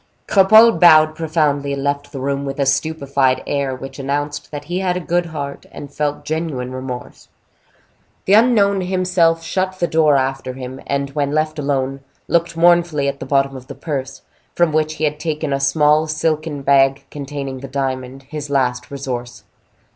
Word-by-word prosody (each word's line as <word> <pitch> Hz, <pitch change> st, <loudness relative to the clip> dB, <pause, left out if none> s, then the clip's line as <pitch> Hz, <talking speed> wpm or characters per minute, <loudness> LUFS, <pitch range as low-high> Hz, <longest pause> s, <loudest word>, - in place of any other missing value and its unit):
Cropole 215 Hz, +4 st, +6 dB
bowed 155 Hz, -3 st, +7 dB
profoundly, 150 Hz, -3 st, 0 dB
and 140 Hz, 0 st, -4 dB
left 145 Hz, 0 st, -2 dB
the 135 Hz, -, -6 dB
room 140 Hz, +1 st, -2 dB
with 135 Hz, 0 st, -5 dB
a 140 Hz, -, +2 dB
stupefied 140 Hz, -2 st, 0 dB
air, 140 Hz, -2 st, -1 dB
which 135 Hz, +2 st, -9 dB
announced 145 Hz, +1 st, -3 dB
that 145 Hz, -1 st, -6 dB
he 175 Hz, +5 st, -3 dB
had 180 Hz, -1 st, 0 dB
a -, -, -2 dB
good 175 Hz, 0 st, -1 dB
heart, 145 Hz, -3 st, -6 dB
and 145 Hz, -1 st, -10 dB
felt 145 Hz, -1 st, -2 dB
genuine 155 Hz, -6 st, -3 dB
remorse. 130 Hz, -1 st, -7 dB, 1.0 s
The 195 Hz, -, +2 dB
unknown 205 Hz, -4 st, +4 dB
himself 180 Hz, -3 st, +1 dB
shut 185 Hz, +2 st, -2 dB
the 175 Hz, -, +1 dB
door 155 Hz, -3 st, +3 dB
after 130 Hz, -1 st, -2 dB
him, 130 Hz, 0 st, -8 dB
and, 140 Hz, 0 st, -2 dB
when 145 Hz, 0 st, -1 dB
left 155 Hz, 0 st, -1 dB
alone, 135 Hz, -1 st, -1 dB, 0.3 s
looked 170 Hz, 0 st, 0 dB
mournfully 170 Hz, -4 st, +3 dB
at 140 Hz, 0 st, -3 dB
the -, -, -7 dB
bottom 135 Hz, -1 st, +1 dB
of 130 Hz, -1 st, -10 dB
the 140 Hz, -, -8 dB
purse, 135 Hz, -4 st, -5 dB, 0.3 s
from 175 Hz, -2 st, +3 dB
which 155 Hz, 0 st, 0 dB
he 155 Hz, -, -5 dB
had 150 Hz, 0 st, 0 dB
taken 155 Hz, -2 st, -2 dB
a 135 Hz, -, 0 dB
small 150 Hz, +3 st, +3 dB
silken 155 Hz, -1 st, -2 dB
bag 135 Hz, 0 st, +3 dB
containing 140 Hz, -2 st, -6 dB
the 135 Hz, -, -8 dB
diamond, 130 Hz, -1 st, -4 dB
his 145 Hz, +1 st, -7 dB
last 125 Hz, -3 st, 0 dB
resource. 125 Hz, -3 st, -6 dB
145 Hz, 175 wpm, -19 LUFS, 135-160 Hz, 1.0 s, bowed